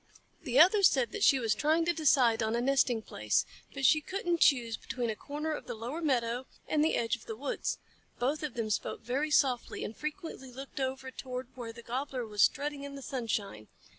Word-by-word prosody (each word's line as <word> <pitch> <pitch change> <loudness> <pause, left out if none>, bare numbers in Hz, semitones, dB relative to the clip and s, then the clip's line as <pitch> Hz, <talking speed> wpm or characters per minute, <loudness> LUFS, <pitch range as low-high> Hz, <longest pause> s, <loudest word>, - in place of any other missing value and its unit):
The 255 +1 +1
other 380 +6 +7
said 265 -10 +4
that 415 - -3
she 275 - +6
was 225 -4 +1
trying 310 +7 +2
to 345 - +2
decide 265 -8 +3
on 220 +1 0
a - - +1
nesting 250 -3 +2
place; 105 - 0 0.4
she 305 +4 +5
couldn't 350 0 -2
choose 235 -7 +4
between 240 -1 -3
a - - -4
corner 300 +6 -4
of 305 - -5
the 240 - -4
lower 245 +9 -5
meadow 250 -4 0 0.2
and 300 -1 +2
the 315 - +2
edge 230 +1 +1
of 235 - -16
the 225 - -4
woods. 275 +5 -2 0.4
Both 275 +5 0
of 300 -5 -4
them 225 -2 -2
spoke - - -2
very 265 +6 -1
softly, 260 -5 +1
and 220 - -5
frequently 305 -4 -6
looked 270 +2 -8
over 265 0 -3
toward 255 -1 -6
where 240 -3 -6
the 235 +1 -12
Gobbler 255 +1 -3
was 210 -2 -2
strutting 285 +4 +2
in 280 0 -7
the 275 - -8
sunshine. 215 - -3
260 Hz, 205 wpm, -31 LUFS, 235-295 Hz, 0.4 s, other